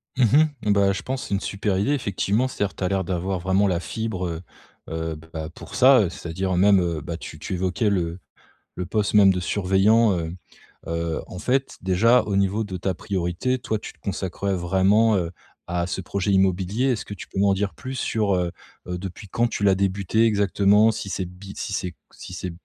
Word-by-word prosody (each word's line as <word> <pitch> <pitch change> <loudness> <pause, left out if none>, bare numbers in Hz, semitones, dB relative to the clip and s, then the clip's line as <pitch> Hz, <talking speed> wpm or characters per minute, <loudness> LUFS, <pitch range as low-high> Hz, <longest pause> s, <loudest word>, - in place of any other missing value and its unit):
Mmh 130 - +3
mh. 155 - +6 0.2
Eh, 105 - +2
bah, 100 -1 +4
je - - -4
pense 130 +1 -3
c'est - - -3
une 100 - +2
super 100 -1 -1
idée. 105 +9 +1
Effectivement, 110 0 0
c’est-à-dire 100 -5 -3
que - - -15
tu - - -3
as - - +2
l'air 95 0 0
d'avoir 90 +1 -2
vraiment 95 +3 +2
la 90 -3 +1
fibre, 95 0 -3
heu, 85 0 -4 0.5
heu, 80 0 -3 0.2
bah, 80 0 -4
pour - - -11
ça. 125 -8 +6
C'est-à-dire 90 +2 -3
même, 100 0 +5
heu, 85 -3 -2
bah, 85 +2 -5
tu 80 - -9
tu 95 - -5
évoquais 95 +4 0
le 85 -2 -1 0.6
le 90 -1 -3
poste 105 +2 -1
même, 100 -2 +7
de 90 - -2
surveillant, 100 +4 +3
heu, 80 +1 -4 0.5
heu, 85 -1 -2
en 90 - -8
fait, 130 +6 0
déjà 110 +7 +4
au 100 -2 -3
niveau 100 +3 +1
de 95 -3 -5
ta 95 +2 -1
priorité, 95 +8 -1
toi, 110 -2 -2
tu - - -9
te - - -31
consacrerais 95 0 -2
vraiment, 95 +5 +3
heu, 85 -2 -1 0.4
à 90 0 -1
ce 95 - -3
projet 100 +2 -1
immobilier. 95 +5 +2
Est-ce 125 -5 0
que 100 - -7
tu 90 - -10
peux - - -6
m'en 100 -1 +4
dire 100 0 -1
plus, 130 0 -7
sur, 105 -6 0
heu, 90 -1 0 0.4
heu, 90 0 -3
depuis 95 +2 -8
quand 120 +5 +1
tu 105 - -4
l'as 95 -1 +5
débuté 100 +3 +1
exactement? 105 0 +4
Si 110 -2 -5
c'est 95 - -2
bi 95 +2 -11
si - - -4
c'est 90 -3 -3 0.2
si - - -10
c'est, 90 0 -4
95 Hz, 215 wpm, -24 LUFS, 90-105 Hz, 0.6 s, même